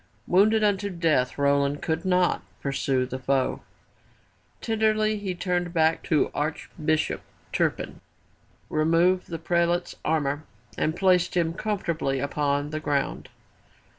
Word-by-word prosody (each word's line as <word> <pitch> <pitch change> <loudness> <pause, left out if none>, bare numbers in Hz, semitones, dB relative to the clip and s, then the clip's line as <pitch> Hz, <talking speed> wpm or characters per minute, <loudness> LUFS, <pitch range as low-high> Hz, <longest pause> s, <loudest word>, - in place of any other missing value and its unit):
Wounded 215 +4 +4
unto 205 -1 +1
death 165 -8 +1
Roland 140 0 +1
could 160 +1 -1
not 180 -1 +2 0.2
pursue 135 -2 0
the 130 +1 -5
foe. 130 0 0 1.0
Tenderly 215 -1 +1
he 190 -3 -3
turned 175 -1 -2
back 160 0 +3
to 155 -3 +2
Archbishop 155 +1 -1 0.3
Turpin, - - -1 0.7
removed 165 +4 +2
the 165 - -3
prelate's 170 +1 0
armor 150 -1 0 0.3
and 155 - 0
placed 180 -1 +2
him 165 -1 +1
comfortably 170 -9 -1
upon 145 +1 -1
the 155 - -2
ground. 145 -3 -2
165 Hz, 115 wpm, -26 LUFS, 145-180 Hz, 1.0 s, Wounded